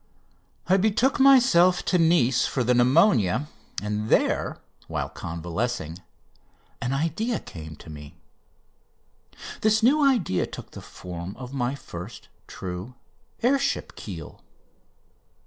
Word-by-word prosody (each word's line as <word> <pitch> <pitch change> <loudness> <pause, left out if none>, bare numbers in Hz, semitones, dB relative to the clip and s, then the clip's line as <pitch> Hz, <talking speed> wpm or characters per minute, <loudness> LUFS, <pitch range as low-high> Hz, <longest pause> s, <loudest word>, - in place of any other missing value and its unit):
I 190 - +4
betook 220 +8 +2
myself 240 -10 +5
to 180 - +2
Nice 135 -7 +3
for 130 - -1
the 125 +1 +3
pneumonia, 125 - +3 0.4
and 105 +1 -2
there, - - +1 0.3
while - - -3
convalescing, 85 +1 -4 0.8
an 125 - -1
idea 165 - -1
came 80 -2 -10
to - - -16
me. 75 -1 -11 1.5
This 215 +1 +3
new 290 +5 +5
idea 225 - +2
took - - -10
the - - -9
form 90 +1 -8
of 125 +2 -8
my 130 0 -1
first 100 -4 -9 0.2
true 95 +6 -7 0.5
air 270 +3 +4
ship 275 - -2
keel. - - -9
130 Hz, 115 wpm, -25 LUFS, -, 1.5 s, myself